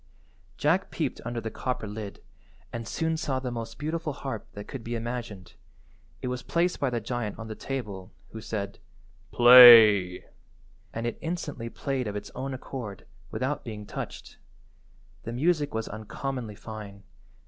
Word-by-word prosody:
Jack - - +2
peeped - - -3
under 120 0 -3
the 115 -1 -5
copper 125 -1 -3
lid 105 -1 -7 0.5
and 115 -1 -5
soon 160 +5 -1
saw 140 -4 -1
the 130 -1 -4
most 115 -1 -6
beautiful 155 0 -2
harp 135 -5 -5
that 105 0 -8
could 130 -4 -7
be 120 +1 -3
imagined. 115 -5 -5 0.7
It - - -1
was 125 0 -3
placed 175 +1 0
by 140 - +1
the 120 -1 -1
giant 115 -1 -3
on 115 - -7
the - - -3
table, 105 -7 -5 0.2
who 110 - -7
said— 100 -3 -4 0.5
"Play," 115 -7 +9 0.7
and 115 +3 -4
it 120 - -3
instantly 150 -8 -4
played 135 -1 -2
of 105 - -4
its 105 - -6
own 130 +1 -4
accord, 110 -7 -7 0.2
without 135 +7 -2
being 105 -3 -7
touched. - - -7 0.8
The 115 - -6
music 150 +3 +1
was 110 0 -3
uncommonly 110 +1 -5
fine. 100 -2 -9
120 Hz, 155 wpm, -28 LUFS, 110-135 Hz, 0.8 s, Play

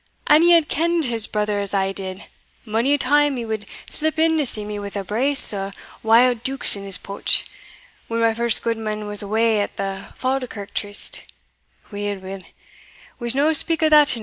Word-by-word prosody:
an 300 +1 +5
ye 345 - +4
had 330 -3 +4
kend 335 +1 0
his 230 -3 0
brother 210 -1 -2
as 200 0 -2
I 195 0 0
did 190 0 -7 0.4
mony 230 +6 +1
a - - -1
time 290 0 +1
he 235 - -5
wad 215 -2 -5 0.2
slip 315 +1 -2
in 320 0 +2
to 290 - +1
see 210 -2 +2
me 210 0 -6
wi' 200 0 -6
a 200 - -3
brace 250 +7 +4
o' 195 0 -5 0.3
wild 230 +1 +3
deukes 265 -1 +3
in 200 - -8
his 195 -1 -2
pouch, 200 - -1 0.6
when 230 0 -3
my 230 -1 +2
first 235 0 +1
gudeman 220 -2 -3
was 205 0 +4
awa 220 +1 0
at 205 - -4
the 195 -1 -5
Falkirk 255 -6 -4
tryst 205 0 +1 0.7
weel, 205 0 -4
weel 190 0 -9 0.8
we'se 240 0 -1
no 295 +3 +2
speak 325 +1 +2
o' 310 - +4
that 300 -4 +5
e'enow." - - -6
225 Hz, 195 wpm, -20 LUFS, 205-275 Hz, 0.8 s, an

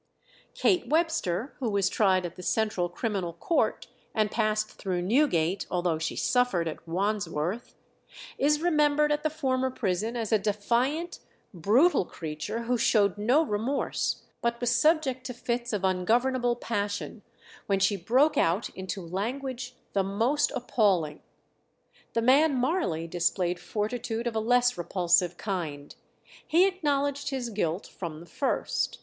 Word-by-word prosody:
Kate 360 - +2
Webster, 310 - 0
who 250 -4 -1
was 200 -2 +2
tried 190 -4 +2
at 175 - -6
the 185 - -9
Central 190 -2 0
Criminal 190 -3 -3
Court, 315 - 0 0.3
and 215 -2 +1
passed 215 -1 0
through 180 -3 -3
Newgate, 195 - +1
although 175 -3 0
she 165 - -3
suffered 245 -10 +1
at 160 +1 -7
Wandsworth, 185 +1 -2 0.6
is 300 +3 +2
remembered 300 -3 +3
at 295 0 +1
the 310 - 0
former 260 -4 0
prison 220 0 -2
as 225 -3 -3
a 220 - +4
defiant, 240 - -1 0.3
brutal 215 - +3
creature 160 +7 -5
who 245 +1 0
showed 205 -4 +3
no 250 +9 +3
remorse, 240 +2 -1 0.2
but 235 0 -1
was 245 -1 +1
subject 270 -1 +2
to 250 - -6
fits 240 0 -2
of 205 -3 -2
ungovernable 240 +7 +1
passion, 205 -2 -3 0.5
when 195 -1 +2
she 195 +1 +3
broke 255 - +2
out 175 +7 +1
into 190 0 -6
language 250 +7 -4 0.2
the 200 - +2
most 225 +10 +1
appalling. 190 -11 +1 0.9
The 230 - 0
man 280 +4 +5
Marley 250 - 0
displayed 175 +1 0
fortitude 225 +3 -3
of 235 -2 -2
a - - +2
less 245 -1 +2
repulsive 175 0 +2
kind. 160 -8 -4 0.5
He 345 +4 +5
acknowledged 285 -6 0
his 255 -4 -3
guilt 180 -3 -1
from 165 -4 -7
the 170 - -12
first. 270 +9 -1
220 Hz, 140 wpm, -28 LUFS, 185-260 Hz, 0.9 s, man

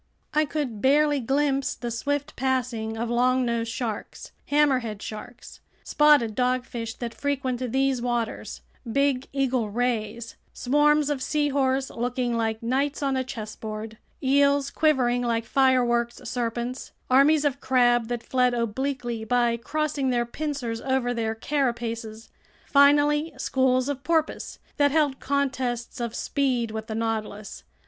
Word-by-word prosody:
I 305 +1 +3
could 280 -8 -3
barely 290 +2 +4
glimpse 275 +2 0
the 240 -1 -5
swift 285 +5 -2
passing 245 -4 -1
of 230 +1 -2
longnose 240 -1 +1
sharks, 230 -2 -5 0.2
hammerhead 260 -8 +2
sharks, 220 +3 -9 0.2
spotted 295 -7 +4
dogfish 250 -2 -1
that 235 -2 -5
frequent 260 -3 -2
these 265 -1 +1
waters, 240 -2 -3 0.3
big 275 0 +1
eagle 260 -5 0
rays, 230 0 -2 0.2
swarms 295 +2 +2
of 275 -3 -2
seahorse 275 -3 0
looking 245 0 -1
like 225 0 -1
knights 275 +5 0
on 275 -1 +1
a 260 - 0
chessboard, 220 -2 -7 0.2
eels 280 +1 +3
quivering 255 -6 +2
like 230 -1 0
fireworks 240 -2 +2
serpents, 240 +1 -4
armies 285 +4 +4
of 280 -1 0
crab 240 -3 +3
that 240 -1 -3
fled 250 -1 +1
obliquely 240 0 -2
by 240 +1 +2
crossing 290 +2 -1
their 240 -1 +1
pincers 250 -4 -4
over 260 -2 0
their 225 -2 -2
carapaces, 230 -4 -3 0.4
finally 290 +2 +4
schools 255 -1 +1
of 280 -1 -3
porpoise 320 -2 -1 0.2
that 285 -1 +4
held 290 -2 +1
contests 260 -4 -2
of 235 -1 -3
speed 255 -5 0
with 220 0 -5
the 220 - -4
Nautilus. 220 -2 -4
255 Hz, 130 wpm, -25 LUFS, 235-280 Hz, 0.4 s, barely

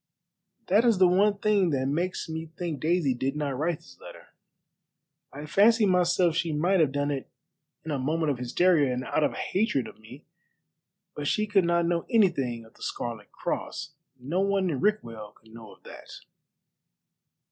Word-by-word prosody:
"That 205 +5 +3
is 230 -4 +3
the 185 -1 +6
one 200 +3 +3
thing 205 -4 +2
that 135 -3 0
makes 170 +8 -2
me 160 0 -5
think 170 -5 -4
Daisy 160 -2 +1
did 135 +3 -2
not 145 -3 -2
write 160 +3 -2
the - - -18
letter. - - -12 1.0
I 145 +2 -8
fancied 210 +6 +4
myself 180 -2 +2
she 165 -1 0
might 175 +6 +2
have 155 -4 +3
done 145 +1 -1
it 135 -2 -4 0.6
in 160 - -4
a 140 - -1
moment 155 +3 0
of 130 - -4
hysteria 145 +3 +2
and 125 0 -3
out 155 - 0
of 145 - +1
hatred 185 - -1
of - - -13
me, 120 +7 -14 0.9
but 145 -1 -4
she 215 - +1
could 200 -3 +2
not 170 0 +2
know 170 0 -1
anything 140 - +1
of 110 - -19
the - - -23
Scarlet 115 -3 -5
Cross. - - -5 0.3
No 145 +9 -2
one 195 -2 +1
in 135 - -3
Rickwell 115 - -2
could 110 +1 -21
know 115 -3 -11
of - - -19
that." - - -12
160 Hz, 180 wpm, -27 LUFS, 135-185 Hz, 1.0 s, the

